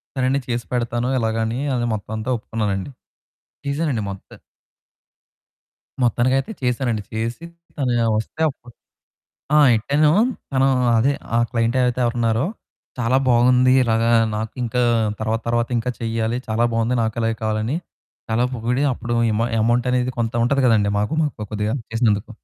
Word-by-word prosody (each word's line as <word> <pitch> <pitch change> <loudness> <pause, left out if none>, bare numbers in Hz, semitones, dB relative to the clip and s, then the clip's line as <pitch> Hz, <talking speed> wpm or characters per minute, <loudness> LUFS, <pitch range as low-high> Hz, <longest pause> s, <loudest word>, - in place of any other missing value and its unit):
సరేండి 130 +1 +1
చేసి 120 -1 -2
పెడతాను. 120 0 -1
ఇలాగని 115 +1 -1
అని 140 - -1
అదే 120 0 -1
మొత్తం 105 +1 -7
అంతా 110 +3 -4
ఒప్పుకున్నానండి. 105 -1 -3 0.8
చేసానండి 140 -5 -1
మొత్తం. 95 - -12 1.6
మొత్తానికైతే 130 - +1
చేసానండి. 125 -3 0
చేసి 115 +8 -3 0.3
తను 130 -5 0 0.2
వస్తే 110 +8 -6
అప్పుడు 125 -3 -16 0.8
ఆ! - - +7 0.2
ఎట్టాను 145 +7 +2 0.4
తను 135 0 +3 0.3
అదే, 125 +6 +3 0.2
ఆ - - +4
క్లయింట్ 115 0 0
అయితే 125 0 0
ఎవరు 120 +1 -1
ఉన్నారో, 115 +2 +1 0.5
"చాలా 125 +1 +2
బాగుంది 125 +1 +4
ఇలాగ 115 -2 +1 0.3
నాకింకా 115 +3 -2 0.4
తర్వాత 110 +1 -1
తర్వాత 120 0 +1
ఇంకా 120 +2 -1
చేయాలి 115 +1 -1
చాలా 110 +2 +1
బాగుంది. 115 +2 +1
నాకు 110 0 -1
అలాగే 115 0 0
కావాలని" 110 +5 -1 0.5
చాలా 115 +2 +2
పొగిడి 120 +3 -1
అప్పుడు 120 -1 -4 0.2
ఇమ 105 +2 0 0.2
అమౌంట్ 120 +2 +2
అనేది 125 0 +1
కొంత 115 -1 -1
ఉంటది 140 +3 +2
కదండీ 105 -4 +3
మాకు. 105 +9 -1
మాకు 145 -8 -3
కొద్దిగా 105 +1 -1 0.2
చేసినందుకు. 110 -2 +1
120 Hz, 140 wpm, -21 LUFS, 110-125 Hz, 1.6 s, ఆ